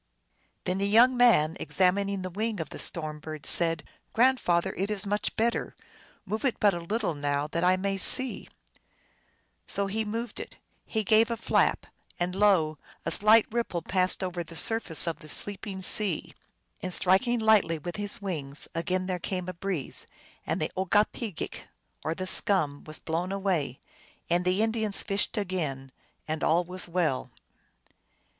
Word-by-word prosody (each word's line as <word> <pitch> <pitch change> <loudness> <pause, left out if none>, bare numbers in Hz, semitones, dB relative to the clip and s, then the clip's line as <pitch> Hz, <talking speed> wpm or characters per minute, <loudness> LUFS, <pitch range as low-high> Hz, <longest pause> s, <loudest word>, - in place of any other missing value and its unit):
Then 185 +1 -2
the 200 0 0
young 240 +5 +5
man, 220 -11 +4
examining 195 +1 0
the 185 - -5
wing 215 +2 -3
of 160 - -4
the - - -8
storm 155 -2 -2
bird, 155 -1 -8
said, 165 -3 +4 0.2
" - - -43
Grandfather, 210 -7 +2
it 195 +2 -2
is 210 -1 -1
much 205 +1 -2
better; 230 +1 -1 0.5
move 215 +3 -4
it 260 -4 0
but 205 -2 +4
a 175 - -3
little 200 +2 -2
now, 145 0 -1
that 170 +3 -3
I 185 +1 +4
may 195 +1 -2
see! 260 +6 +4 0.6
" - - -39 0.3
So 200 - 0
he 215 +3 -2
moved 225 +1 -5
it; - - -8 0.3
he 220 -1 -1
gave 220 +3 +4
a 235 - -2
flap, 230 - +1 0.3
and 175 +1 -1
lo! 185 -7 +2 0.3
a - - -1
slight 215 +2 +6
ripple 225 -8 -2
passed 185 +1 +1
over 180 -2 -3
the 165 +1 -13
surface 210 -3 +4
of 165 -2 -3
the 155 -3 -13
sleeping 195 +2 -1
sea. 195 -2 +1 0.5
And - - -4
striking 195 +8 +3
lightly 220 -7 +3
with 175 +5 -7
his 205 0 -2
wings, 150 -8 -4
again 180 +3 -1
there 185 -1 -3
came 180 +1 -4
a 185 - -4
breeze, 175 -4 -4 0.4
and - - -1
the - - -2
OgokpcgeaJc, 205 +1 -1 0.4
or 160 - -2
the 185 - -4
scum, 175 -7 +2
was 155 0 -2
blown 170 +3 -3
away, 185 -10 -1 0.5
and 175 +1 +2
the 185 +4 +2
Indians 220 -2 0
fished 200 +2 -1
again, 155 -10 -3 0.4
and 155 0 -3
all 170 +2 +3
was 180 +1 -5
well. 170 -6 -1
185 Hz, 165 wpm, -27 LUFS, 165-210 Hz, 0.6 s, slight